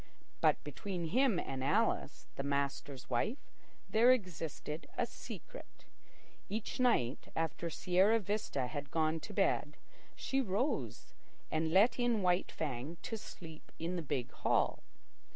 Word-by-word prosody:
But - - +4
between 180 -5 -4
him 250 0 +3
and 130 -1 -3
Alice, 195 +1 +1
the - - -2
master's 140 -1 -2
wife, 215 - -1 0.4
there 235 +3 +6
existed 165 - -2
a - - +2
secret. - - -10 0.6
Each 215 +4 -3
night, 155 - +2
after 165 +1 -1
Sierra 185 +7 +3
Vista 200 - -1
had 145 +2 -5
gone 160 +1 +1
to - - -8
bed, - - +1 0.4
she 270 0 0
rose 225 +5 -1 0.4
and 160 0 +1
let 205 +8 +5
in 240 -4 +2
White 180 0 +2
Fang 145 +2 -3
to 225 - -3
sleep 165 -7 -10
in 170 +3 -2
the 175 - -1
big 135 -5 -2
hall. - - +1
175 Hz, 135 wpm, -35 LUFS, 150-220 Hz, 0.6 s, there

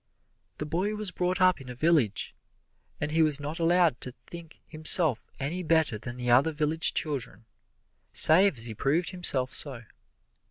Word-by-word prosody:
The 150 - -5
boy 185 +7 -2
was 210 -3 -4
brought 180 +1 -2
up 185 -5 +2
in 130 - -12
a 125 - -8
village, 140 - 0 0.7
and 150 0 -4
he 160 +1 +1
was 150 -2 +3
not 150 +4 -6
allowed 170 -5 +1
to 130 0 -8
think 170 -2 -12
himself 155 - +1
any 155 +7 -4
better 160 -9 0
than 120 +2 -9
the 125 -1 -2
other 135 +6 +4
village 155 +1 +2
children, 125 -8 -3 0.7
save 180 -1 +5
as 115 - -6
he 115 - -6
proved 145 +10 -1
himself 135 -8 -1
so. 130 -5 -1
155 Hz, 165 wpm, -27 LUFS, 130-170 Hz, 0.7 s, save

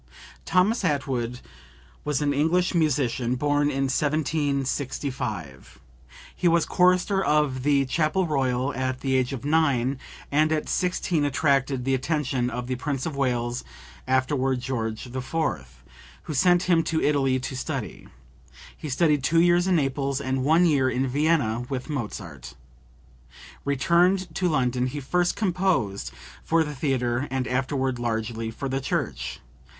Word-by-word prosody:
[Thomas 190 +6 +2
Attwood 130 -6 -1 0.6
was 150 -1 -1
an 145 -1 +1
English 170 +6 +2
musician, 130 -6 +1
born 145 +2 +1
in 135 -1 -1
1765. 135 - -2 0.6
He 180 - +1
was 170 0 +3
chorister 185 +2 +3
of 150 -4 +1
the 140 0 +2
Chapel 155 +6 +1
Royal 135 -3 0
at 130 0 -2
the 135 -1 0
age 130 0 +1
of 135 -1 -6
nine, 140 -4 +2 0.3
and 155 +2 +3
at 155 -1 0
sixteen 180 -3 0
attracted 140 -2 +1
the 135 - +1
attention 130 -2 0
of 125 0 -4
the 125 0 -3
Prince 135 0 -3
of 160 - -3
Wales, 120 -2 -1 0.4
afterward 130 0 +1
George 115 -3 -3
IV., 130 +4 -7 0.9
who 155 - -5
sent 175 +4 +4
him 170 -3 +3
to 160 0 -1
Italy 135 -4 +2
to 130 +1 -5
study. 125 - -5 0.7
He 155 - -7
studied 150 +1 +2
two 165 +3 +3
years 175 +1 +4
in 185 - +3
Naples 135 -2 0
and 130 -1 -1
one 160 +5 +4
year 140 -6 +3
in 130 +1 0
Vienna 135 -4 +1
with 135 +2 -4
Mozart. 95 - -6 1.1
Returned 170 +6 +2
to 180 +2 0
London 125 -4 +1
he 140 +3 -4
first 175 +6 0
composed 180 - 0 0.3
for 165 0 +2
the 150 -1 -5
theatre 130 -2 -1
and 130 0 -2
afterward 130 0 -1
largely 115 -1 -2
for 135 +5 -5
the 135 +1 -2
church. - - -3
140 Hz, 140 wpm, -25 LUFS, 130-155 Hz, 1.1 s, sent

